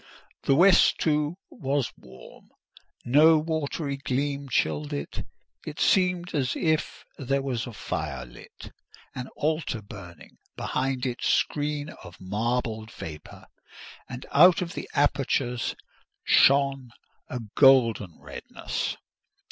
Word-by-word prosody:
The 135 - +4
west, 185 +4 +6
too, 150 +1 0
was 140 -2 -1
warm: - - -15 0.6
no 155 +6 +6
watery 155 -2 -2
gleam 140 +1 -2
chilled 75 - 0
it—it 70 - -8
seemed 180 -2 +2
as 130 -4 0
if 155 -2 -1
there 135 0 -1
was 125 -3 -2
a - - -6
fire 75 - -4
lit, - - -13 0.4
an 125 0 -6
altar 155 -5 -1
burning 90 -5 -12 0.2
behind 130 0 -2
its 125 -2 -2
screen 150 0 0
of 90 -1 -12
marbled 110 +3 -2
vapour, 75 -2 -10 0.6
and 125 0 -7
out 175 +4 +6
of 170 - -7 0.2
apertures 135 -4 0 0.5
shone 135 -2 +4 0.4
a 125 - -5 0.2
golden 115 - +4
redness. - - -5
135 Hz, 110 wpm, -26 LUFS, 115-150 Hz, 0.6 s, west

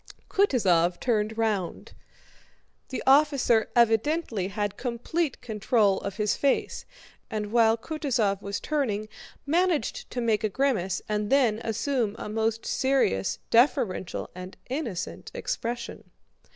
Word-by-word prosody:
Kutúzov 185 - +3
turned 220 -2 0
round. 210 -6 -2 1.0
The 260 - -4
officer 270 -5 +4
evidently 235 - +2
had 205 0 -3
complete 250 +5 -2
control 210 -2 +1
of 200 0 -6
his 210 -2 +1
face, 280 -1 0 0.4
and 210 -3 -3
while 225 -1 +4
Kutúzov 240 -9 -1
was 200 0 -4
turning 225 -9 -1 0.4
managed 330 -3 0
to 250 - -4
make 230 -2 +1
a 215 - +1
grimace 205 -7 0
and 210 -1 -1
then 245 -6 +3
assume 230 -1 -1
a - - -6
most 225 +1 -1
serious, 260 - +1
deferential, 235 - +1
and 185 +1 -9
innocent 255 - -4
expression. 240 - -4
225 Hz, 115 wpm, -27 LUFS, 210-265 Hz, 1.0 s, officer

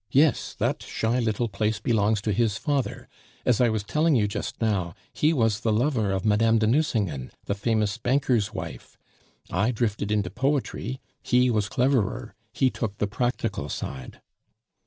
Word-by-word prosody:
"Yes. 140 +4 +2
That - - 0
shy 115 +3 -1
little 115 0 0
place 105 +1 -1
belongs 110 -3 +1
to 105 - -1
his 110 0 +1
father. 140 -3 -2 0.4
As 125 -3 +3
I 120 - +5
was 110 -2 -1
telling 155 +7 +2
you 105 -4 +3
just 100 - -5
now, 95 -7 0 0.2
he 155 - +2
was 115 -8 +2
the 110 - 0
lover 110 -2 +1
of 95 +1 -1
Mme. 110 +2 +4
de 110 - +2
Nucingen, 110 - 0 0.2
the - - 0
famous 105 +1 0
banker's 125 -4 +1
wife. - - -7 0.5
I 100 +6 +2
drifted 110 -4 -1
into 100 -4 0
poetry; 130 0 -1 0.2
he 125 0 +3
was 105 -2 0
cleverer, 125 -2 0 0.2
he 130 +2 +2
took 105 -4 -4
the 105 - +1
practical 110 - -2
side." 65 -2 -6
110 Hz, 160 wpm, -26 LUFS, 105-125 Hz, 0.5 s, I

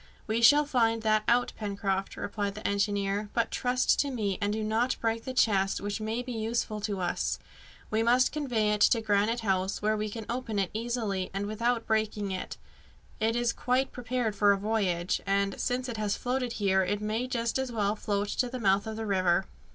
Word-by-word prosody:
"We 220 +2 0
shall 290 +5 +7
find 230 -5 +1
that 215 -1 +3
out, 245 +1 +3
Pencroft," 195 -2 -2
replied 200 -1 -3
the 215 - -3
engineer; 200 0 0
"but 235 -1 0
trust 250 0 +1
to 285 - +2
me, 210 -7 -2
and 205 0 +1
do 215 +1 -2
not 225 +4 +1
break 225 0 -1
the 260 - -4
chest, 195 -5 +2
which 205 +2 -4
may 220 +3 -2
be 250 - -6
useful 220 -1 -2
to 205 -2 -2
us. 175 -1 -1 0.5
We 220 +1 +2
must 245 +2 +4
convey 245 -8 0
it 210 -1 -1
to 230 +2 +5
Granite 215 +2 +1
House, 190 -2 0
where 215 +1 +1
we 215 0 -2
can 220 +1 -6
open 235 -3 -3
it 195 -2 0
easily 220 -4 -2
and 200 +1 -1
without 230 +3 0
breaking 215 -2 0
it. 185 - -5 0.6
It 225 +1 +1
is 240 -1 +1
quite 255 +2 0
prepared 245 -3 -2
for 205 0 +5
a 200 - +3
voyage, 195 -4 0
and, 200 0 0
since 250 +1 -1
it 235 -3 -4
has 210 -1 -1
floated 250 -1 -2
here, 195 -3 +2
it 200 +3 -1
may 215 +4 -2
just 235 -1 -1
as 265 -2 -2
well 210 -2 0
float 205 -1 -2
to 250 +3 0
the 255 - -5
mouth 200 -2 +2
of 220 - -4
the 225 0 -4
river." 185 -2 +2
215 Hz, 205 wpm, -29 LUFS, 200-235 Hz, 0.6 s, shall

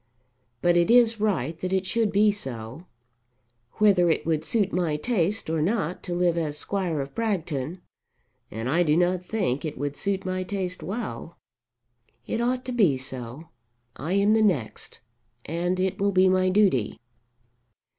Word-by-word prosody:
But 175 0 +4
it 170 -1 +3
is 230 -2 +5
right 170 - 0
that 185 +2 -3
it 190 0 0
should 225 +1 0
be 210 +1 +4
so. 130 - -7 0.9
Whether 195 -5 +4
it 160 - 0
would 160 -2 0
suit 205 -4 0
my 170 -4 0
taste 205 +2 -1
or 160 -1 -1
not 180 -1 -1
to 175 -2 -3
live 175 -1 +2
as 150 -2 -3
Squire 175 -3 -1
of 135 0 -7
Bragton, 175 - -2 0.7
and 115 +3 -5
I 160 +7 +2
do 155 -2 +3
not 180 +1 +1
think 180 - -1
it 155 -2 -5
would 145 +1 -3
suit 195 +2 -2
my 185 0 -2
taste 185 -1 -4
well, 205 -5 -6 0.9
it 230 - -2
ought 250 +1 -1
to 255 - -4
be 195 - +3
so. 130 +3 -7 0.5
I 155 +8 -4
am 200 +2 +3
the 220 - +3
next, 165 - -1 0.4
and 175 +3 -1
it 190 0 -1
will 200 +1 +2
be 185 0 +4
my 185 0 +3
duty." 185 - +2
180 Hz, 165 wpm, -25 LUFS, 155-200 Hz, 0.9 s, is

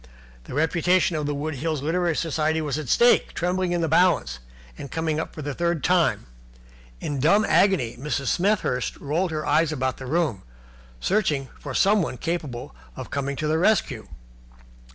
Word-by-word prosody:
The - - -8
reputation 170 +3 +2
of 150 -2 -2
the 145 - -1
Wood 155 +2 -3
Hills 155 0 -2
Literary 170 +1 0
Society 160 0 0
was 150 -2 -2
at 145 -6 -6
stake, 240 0 +4
trembling 180 +1 0
in 175 -1 0
the 165 - +1
balance, 155 - +2 0.4
and 140 - -8
coming 160 0 -1
up 160 - -4
for 155 - -6
the 145 0 -3
third 170 -1 -1
time. 180 - +2 0.7
In 145 -2 -3
dumb 200 +10 +4
agony 175 - +2
Mrs. 145 0 -2
Smethurst 175 - 0
rolled 165 +6 -1
her 155 -1 -3
eyes 160 0 +2
about 130 -3 -2
the 130 - -8
room 150 - 0 0.6
searching 155 -10 0
for 140 -3 -6
someone 195 -10 +2
capable 145 - -4 0.2
of - - -8
coming 140 0 -2
to 155 - -2
the 160 +1 +1
rescue. 165 - +1
155 Hz, 170 wpm, -24 LUFS, 140-175 Hz, 0.7 s, stake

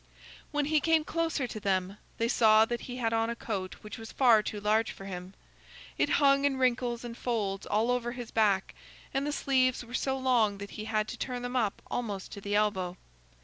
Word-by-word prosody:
When 295 -1 0
he 305 +1 +3
came 320 +1 +3
closer 325 -4 -1
to 220 -3 -6
them, 195 -1 -1 0.2
they 230 - +1
saw 220 -2 +5
that 240 +1 -3
he 250 0 -7
had 230 -2 0
on 225 0 +1
a 235 - -2
coat 190 -7 -4
which 210 +2 -8
was 225 0 -8
far 235 -5 +5
too 210 0 -4
large 215 +2 +2
for 195 - -9
him. 185 0 -7 0.6
It - - +1
hung 275 -1 +4
in 280 -2 +2
wrinkles 245 -2 +1
and 235 -1 -6
folds 205 -6 -2
all 220 +4 +2
over 240 -1 -1
his 245 -3 -7
back, 205 -3 +2 0.4
and 275 +1 0
the - - 0
sleeves 255 -4 +1
were 240 - -13
so 265 +1 0
long 240 -6 +2
that 200 0 -8
he 215 - -6
had 215 -1 0
to - - -6
turn 250 -2 -3
them 245 +1 -4
up 220 -5 0
almost 205 -6 -3
to 200 - -8
the 205 +1 -2
elbow. 190 -4 0
230 Hz, 215 wpm, -30 LUFS, 210-255 Hz, 0.6 s, saw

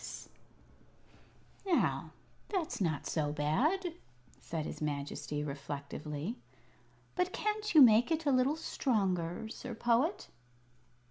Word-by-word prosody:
"Now, 370 -4 +1 0.4
that's 360 - -2
not 160 -5 0
so 150 -2 0
bad," 290 - +1 0.5
said 160 -2 -4
his - - -6
Majesty, 145 0 -3
reflectively. 145 - -5 0.8
"But 360 0 0
can't 425 -2 -2
you 300 - +11
make 230 +2 +6
it 325 -1 0
a 285 - +4
little 260 +3 +3
stronger, 195 - -1
Sir 240 +1 -6
Poet?" 240 - +1
225 Hz, 105 wpm, -33 LUFS, -, 0.8 s, you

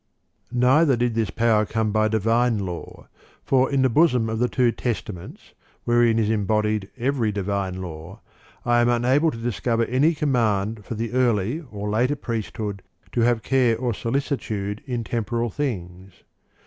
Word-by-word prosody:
3. 125 - -5
Neither 135 +3 +4
did 120 0 0
this 110 -2 0
power 115 -2 +2
come 110 0 -1
by 110 0 +2
divine 115 +2 +2
law; 90 -4 -6 0.4
for 130 0 +2
in 135 -1 +2
the - - +5
bosom 125 -4 +3
of 110 - -2
the 125 0 +2
two 125 -2 +2
Testaments, 105 -6 -5 0.3
wherein 120 -1 +3
is 110 -2 +2
embodied 105 -1 0
every 125 -3 0
divine 100 -2 -2
law, 85 +4 -9 0.5
I 120 0 +3
am 120 - +3
unable 125 +6 +3
to 115 - -6
discover 115 0 -1
any 145 +8 +2
command 115 - 0
for 115 - -5
the 115 +1 -3
early 125 - +1
or 105 -1 -5
later 120 +7 +1
priesthood 110 -5 -4 0.3
to 120 - 0
have 115 -1 +2
care 125 -4 +2
or 120 0 -1
solicitude 110 -5 -3
in 120 -3 -2
temporal 115 +1 -2
things. 95 -9 -5
115 Hz, 160 wpm, -23 LUFS, 105-125 Hz, 0.5 s, the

